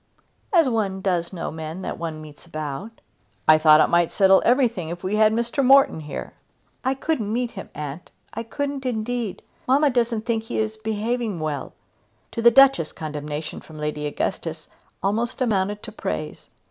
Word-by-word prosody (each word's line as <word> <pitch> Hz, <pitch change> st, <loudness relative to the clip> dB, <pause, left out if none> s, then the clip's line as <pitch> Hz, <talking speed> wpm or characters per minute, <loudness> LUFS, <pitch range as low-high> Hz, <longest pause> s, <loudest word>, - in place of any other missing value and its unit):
"As 335 Hz, -7 st, +5 dB
one 210 Hz, -6 st, 0 dB
does 175 Hz, -3 st, 0 dB
know 180 Hz, -, -4 dB
men 160 Hz, +3 st, -6 dB
that -, -, -5 dB
one 160 Hz, -2 st, -5 dB
meets 150 Hz, +2 st, -13 dB
about." 155 Hz, +8 st, -6 dB, 0.5 s
"I 155 Hz, 0 st, +7 dB
thought 155 Hz, -1 st, +7 dB
it -, -, +6 dB
might 170 Hz, -1 st, +2 dB
settle 195 Hz, -1 st, +5 dB
everything 235 Hz, -, +2 dB
if 175 Hz, +1 st, -6 dB
we 190 Hz, +3 st, -1 dB
had 215 Hz, 0 st, +5 dB
Mr. 235 Hz, +4 st, 0 dB
Morton 270 Hz, -8 st, +6 dB
here." 150 Hz, -2 st, -7 dB, 0.5 s
"I 260 Hz, +1 st, +1 dB
couldn't 265 Hz, -7 st, -1 dB
meet 240 Hz, +1 st, -1 dB
him, 195 Hz, -, -8 dB
aunt; 150 Hz, +3 st, -6 dB, 0.2 s
I 225 Hz, -, -3 dB
couldn't 280 Hz, +4 st, -4 dB
indeed. 240 Hz, -3 st, -3 dB, 0.2 s
Mamma 280 Hz, +3 st, +4 dB
doesn't 235 Hz, -3 st, 0 dB
think 225 Hz, -2 st, -1 dB
that -, -, -20 dB
he -, -, -3 dB
is 220 Hz, 0 st, -1 dB
behaving 220 Hz, -1 st, -2 dB
well." 150 Hz, -3 st, -3 dB, 0.6 s
To 230 Hz, -, -3 dB
the 235 Hz, -, +8 dB
Duchess 270 Hz, -, +5 dB
condemnation 150 Hz, 0 st, -5 dB
from 155 Hz, -, -13 dB
Lady 150 Hz, 0 st, -3 dB
Augustus 145 Hz, -, -3 dB, 0.4 s
almost 225 Hz, +6 st, -1 dB
amounted 205 Hz, -4 st, 0 dB
to 220 Hz, -, -7 dB
praise. 190 Hz, -7 st, -5 dB
210 Hz, 170 wpm, -23 LUFS, 160-235 Hz, 0.6 s, the